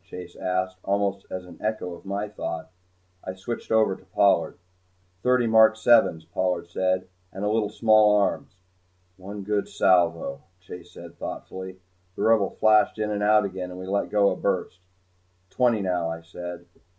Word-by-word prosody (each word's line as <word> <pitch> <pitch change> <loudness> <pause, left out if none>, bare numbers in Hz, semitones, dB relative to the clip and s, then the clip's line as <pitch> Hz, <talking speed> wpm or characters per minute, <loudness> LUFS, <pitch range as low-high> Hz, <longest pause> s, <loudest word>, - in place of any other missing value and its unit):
Chase 90 -1 -10
asked 95 0 -2
almost 100 0 -1
as 90 -1 -6
an 90 - -14
echo 100 -5 -3
to - - -17
my 100 +2 -2
thought. 90 -6 -6 0.5
I 95 - -6
switched 115 +5 -6
over 110 -3 +3
to - - -18
Pollard. 100 +1 +2 0.6
"Thirty 125 +1 +3
mark 110 -1 +6
sevens," 110 -8 +4
Pollard 90 0 -2
said, 95 0 0 0.2
"and 95 +2 -5
a - - +1
little 110 -2 +1
small 110 -1 +4
arms." 100 -2 0 0.6
"One 100 +2 -8
good 105 +1 -1
salvo," 85 -6 +2 0.2
Chase 90 -1 -11
said, 85 -1 -12
thoughtfully. 95 0 -7 0.3
The - - -3
Rebel 110 -3 +3
flashed 110 0 +3
in 105 -1 -2
and 105 -1 -2
out 105 0 +4
again, 95 -2 -5
and 90 0 -9
we 95 - -7
let 100 +2 -1
go 100 -1 +3
a - - -2
burst. - - -2 0.7
"Twenty, 120 -4 +2
now," 90 -3 -1
I 80 0 -5
said. 85 +1 -8
95 Hz, 165 wpm, -25 LUFS, 90-105 Hz, 0.7 s, mark